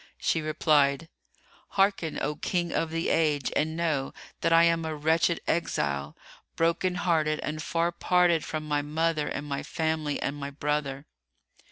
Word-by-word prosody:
She 160 - 0
replied, 155 0 +2 0.7
"Hearken, 195 -5 +2
O 150 - -1
King 175 +2 -1
of 165 - 0
the 165 +1 -1
Age, 150 -4 +1
and 160 +1 0
know 155 -5 -1 0.2
that 165 - +1
I 165 0 +7
am 165 -1 +3
a 160 -1 -3
wretched 160 +3 +2
exile, 70 - -1 0.4
broken 170 +2 +1
hearted 155 -4 +1
and 155 0 -4
far 170 +2 0
parted 175 -1 +2
from 155 -1 -4
my 145 -1 +1
mother 155 +1 0
and 145 - -4
my 140 -1 -3
family 160 -3 -2
and 140 - -2
my 140 -1 -5
brother." 145 -1 -2
160 Hz, 155 wpm, -27 LUFS, 145-165 Hz, 0.7 s, I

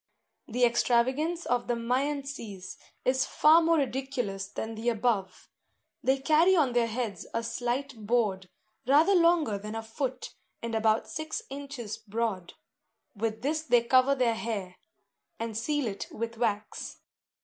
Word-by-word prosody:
The 245 +1 +2
extravagance 260 +8 +1
of 245 -1 0
the 240 - +1
Myantses 245 -5 -3 0.3
is 260 +1 +3
far 315 +2 +6
more 330 0 +3
ridiculous 255 -8 -2
than 220 +2 -5
the 225 +2 -1
above. 210 -5 -1 0.6
They 265 +1 +3
carry 315 +7 +4
on 285 -8 +3
their 240 -1 +3
heads 230 -2 -4
a 230 - 0
slight 245 +3 -2
board, 205 -6 +1 0.4
rather 305 +8 +5
longer 335 - +3
than 210 +2 -6
a 225 - -4
foot, 255 +3 -4 0.3
and 230 0 -5
about 220 0 +2
six 310 0 -4
inches 275 -6 -6
broad; 220 -4 -3 0.6
with 220 +2 -3
this 310 +3 0
they 245 -6 +3
cover 255 +3 +4
their 250 -3 +2
hair, 210 -5 -4 0.6
and 225 -1 -4
seal 290 +5 0
it 200 -3 -4
with 230 +1 -5
wax. 215 -2 -2
240 Hz, 140 wpm, -29 LUFS, 220-275 Hz, 0.6 s, far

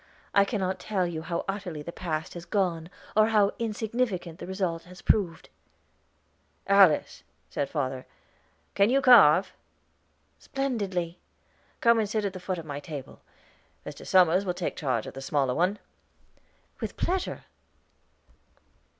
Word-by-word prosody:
I 200 - +5
cannot 190 -3 -2
tell 190 -1 -1
you 165 -2 -4
how 170 +1 -3
utterly 190 -6 -4
the 170 - -6
past 160 -3 -4
has 175 -1 -8
gone, 175 -5 -1 0.3
or 215 0 +5
how 210 -3 +3
insignificant 220 -6 -2
the - - -7
result 185 -3 -2
has 180 +1 -13
proved." 175 -6 +1 1.2
"Alice," 195 -6 +4 0.3
said 140 - -2
father, 130 -4 -3 0.7
"can 200 +2 +4
you 270 +2 +4
carve?" 195 - +6 0.9
"Splendidly." 200 -11 -3 0.6
"Come 235 -1 +5
and 215 -2 0
sit 215 0 -1
at 195 - -2
the 185 - -7
foot 185 0 -3
of 165 - -7
my 145 -2 -5
table; 145 -2 -9 0.6
Mr. - - -8
Somers 185 0 +4
will 180 -3 -2
take 180 -1 -3
charge 130 -7 -1
of - - -8
the 135 - -8
smaller 135 -2 0
one." 180 +8 +1 1.0
"With - - -5
pleasure." 370 +1 -2
185 Hz, 140 wpm, -27 LUFS, 160-205 Hz, 1.2 s, carve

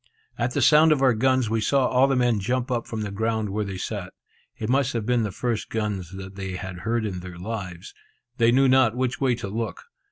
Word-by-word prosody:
At 120 +1 -2
the - - +2
sound 155 +1 +6
of 140 -3 +2
our 130 -2 +5
guns, 130 +1 +2
we 110 +1 0
saw 135 +4 +2
all 130 +2 +4
the 135 - +1
men 120 -3 +2
jump 125 +5 -1
up 120 -2 -1
from 110 -1 -4
the 105 -1 -4
ground 110 +1 -1
where 105 +2 -1
they 100 -2 -5
sat. - - -5 0.4
It 110 - -4
must 135 +2 +1
have 115 -3 -2
been 120 0 +2
the 105 -2 -2
first 115 +3 -2
gun 105 -2 -1
the 95 +2 -9
I 95 -1 -5
had 90 -1 -7
heard 115 +2 -1
in 95 -4 -3
their 90 -1 -9
lives. 90 -3 -6 0.4
They 115 -1 +4
knew 135 +2 +4
not 130 -3 +4
which 130 +1 -1
way 130 -3 +3
to 115 -4 -6
look. 110 +2 -4
115 Hz, 235 wpm, -24 LUFS, 100-125 Hz, 0.4 s, sound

